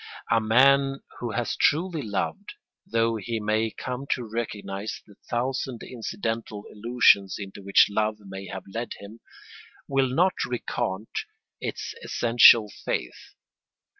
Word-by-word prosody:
A 115 Hz, 0 st, +4 dB
man 135 Hz, +4 st, +4 dB, 0.2 s
who 120 Hz, -2 st, -4 dB
has 120 Hz, +2 st, -1 dB
truly 165 Hz, +1 st, +1 dB
loved, 100 Hz, -5 st, -3 dB, 0.3 s
though 115 Hz, 0 st, +1 dB
he 115 Hz, +2 st, -3 dB
may 110 Hz, +1 st, 0 dB
come 130 Hz, +4 st, -6 dB
to 125 Hz, -, -5 dB
recognise 105 Hz, -2 st, -4 dB
the 105 Hz, -, -17 dB, 0.2 s
thousand 125 Hz, 0 st, -2 dB
incidental 115 Hz, -2 st, -4 dB
illusions 105 Hz, -3 st, +3 dB
into 100 Hz, -1 st, -8 dB
which 100 Hz, 0 st, +5 dB
love 110 Hz, +1 st, 0 dB
may 95 Hz, -1 st, -9 dB
have 95 Hz, -1 st, -6 dB
led 115 Hz, +1 st, -3 dB
him, 105 Hz, +3 st, -12 dB, 0.7 s
will 135 Hz, -1 st, +2 dB
not 175 Hz, +9 st, +3 dB
recant 115 Hz, -4 st, -3 dB, 0.5 s
its -, -, -5 dB
essential 115 Hz, -2 st, +6 dB, 0.2 s
faith. 60 Hz, -, -4 dB
115 Hz, 125 wpm, -26 LUFS, 105-125 Hz, 0.7 s, essential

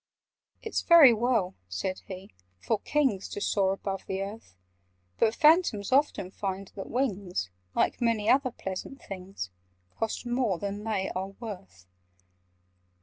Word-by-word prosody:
"It's 445 Hz, -, -1 dB
very 325 Hz, -8 st, +8 dB
well," 225 Hz, -5 st, +1 dB, 0.2 s
said 95 Hz, -, -3 dB
he, 190 Hz, 0 st, -9 dB, 0.3 s
"for 215 Hz, -, 0 dB
Kings 265 Hz, -10 st, 0 dB
To -, -, -5 dB
soar 195 Hz, -1 st, +2 dB
above 195 Hz, -1 st, -5 dB
the 190 Hz, 0 st, -2 dB
earth: 200 Hz, -, -9 dB, 0.6 s
But 225 Hz, 0 st, +3 dB
Phantoms 300 Hz, -, +4 dB
often 265 Hz, -9 st, +2 dB
find 195 Hz, -1 st, -4 dB
that 195 Hz, -, -7 dB
wings— 195 Hz, -, -1 dB, 0.2 s
Like -, -, +1 dB
many 230 Hz, -3 st, +1 dB
other 265 Hz, +1 st, +4 dB
pleasant 195 Hz, +4 st, -6 dB
things— 185 Hz, -, -7 dB, 0.5 s
Cost 225 Hz, +2 st, -2 dB
more 240 Hz, -6 st, +1 dB
than 200 Hz, +2 st, -4 dB
they 205 Hz, -4 st, -1 dB
are 190 Hz, +1 st, -3 dB
worth. 95 Hz, -, -8 dB
205 Hz, 135 wpm, -28 LUFS, 190-240 Hz, 0.6 s, very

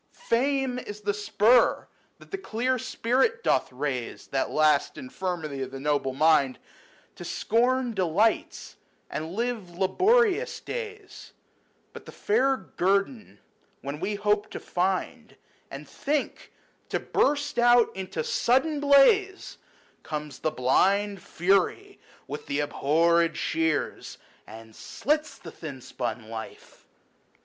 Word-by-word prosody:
Fame 260 Hz, +1 st, +1 dB
is 210 Hz, -3 st, -8 dB
the 205 Hz, 0 st, -1 dB
spur 210 Hz, +3 st, +3 dB, 0.3 s
that -, -, -18 dB
the 390 Hz, -, -2 dB
clear 255 Hz, -, -1 dB
spirit 265 Hz, -, 0 dB
doth -, -, +1 dB
raise 130 Hz, -2 st, -4 dB
70 -, -, -23 dB
(That 135 Hz, -, 0 dB
last 155 Hz, -2 st, +2 dB
infirmity 155 Hz, -1 st, -5 dB
of 130 Hz, 0 st, -5 dB
noble 135 Hz, -1 st, -1 dB
mind) 140 Hz, -3 st, +3 dB, 0.6 s
To -, -, -8 dB
scorn 245 Hz, +2 st, 0 dB
delights 195 Hz, +3 st, 0 dB, 0.3 s
and 160 Hz, +3 st, -5 dB
live 220 Hz, -6 st, -3 dB
laborious 435 Hz, -, +2 dB
days; 430 Hz, -4 st, -8 dB, 0.6 s
But -, -, -11 dB
the -, -, -8 dB
fair 275 Hz, -11 st, +1 dB
guerdon 200 Hz, +4 st, -2 dB, 0.4 s
when 140 Hz, +2 st, -6 dB
we 200 Hz, +4 st, -2 dB
hope 210 Hz, 0 st, 0 dB
to -, -, -7 dB
find, 185 Hz, +1 st, -2 dB, 0.3 s
And -, -, -9 dB
think 290 Hz, +1 st, -3 dB, 0.4 s
to -, -, -1 dB
burst 285 Hz, -3 st, 0 dB
out 240 Hz, -1 st, +4 dB
into 185 Hz, -4 st, -4 dB
sudden 270 Hz, -, +1 dB
blaze, 335 Hz, +8 st, +3 dB, 0.4 s
Comes 150 Hz, -3 st, -6 dB
the -, -, 0 dB
blind 195 Hz, +9 st, +1 dB
Fury 195 Hz, -, 0 dB, 0.3 s
with -, -, -7 dB
the 140 Hz, +1 st, -1 dB
abhorred 165 Hz, +3 st, +2 dB
shears. 160 Hz, -2 st, -2 dB, 0.3 s
And 110 Hz, 0 st, -12 dB
slits 300 Hz, +1 st, -2 dB
the -, -, -11 dB
thin 145 Hz, -5 st, -8 dB
spun 120 Hz, -3 st, -5 dB
life. 110 Hz, 0 st, -10 dB
200 Hz, 120 wpm, -26 LUFS, -, 0.6 s, out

